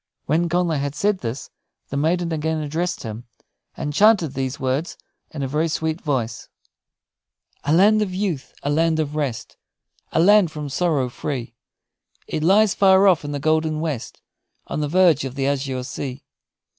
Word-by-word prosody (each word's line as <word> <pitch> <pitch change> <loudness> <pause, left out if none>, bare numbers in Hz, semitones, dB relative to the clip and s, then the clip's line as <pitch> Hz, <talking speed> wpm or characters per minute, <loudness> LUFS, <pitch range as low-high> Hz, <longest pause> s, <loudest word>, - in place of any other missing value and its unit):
When 170 +4 +1
Connla 175 -3 +1
had 140 +1 -3
said 200 +3 +1
this, 125 +1 -5 0.4
the - - -5
maiden 165 +4 0
again 160 0 -1
addressed 160 +4 -2
him, 110 +1 -7 0.5
and 150 - -3
chanted 200 -5 +4
these 135 0 -3
words 135 +6 -2 0.3
in 145 -3 -5
a - - -1
very 150 +5 0
sweet 160 +1 -2
voice: 120 -6 -3 1.2
"A 145 - +1
land 205 +6 +5
of 205 -3 -1
youth, 185 -7 -3
a 145 - 0
land 160 +1 +2
of 150 -1 -2
rest, 140 -7 -3 0.5
A - - +1
land 200 +1 +5
from 150 -1 -6
sorrow 145 -3 0
free; 120 -1 -5 0.7
It - - -3
lies 195 +5 +4
far 190 0 +5
off 180 -5 +4
in 145 - -5
the 145 - -2
golden 155 +1 +1
west, 155 -7 -4 0.4
On - - -3
the 150 - 0
verge 170 -4 +4
of 135 -1 -5
the 135 -1 -1
azure 135 -2 -1
sea. 130 +1 -6
155 Hz, 170 wpm, -22 LUFS, 140-175 Hz, 1.2 s, land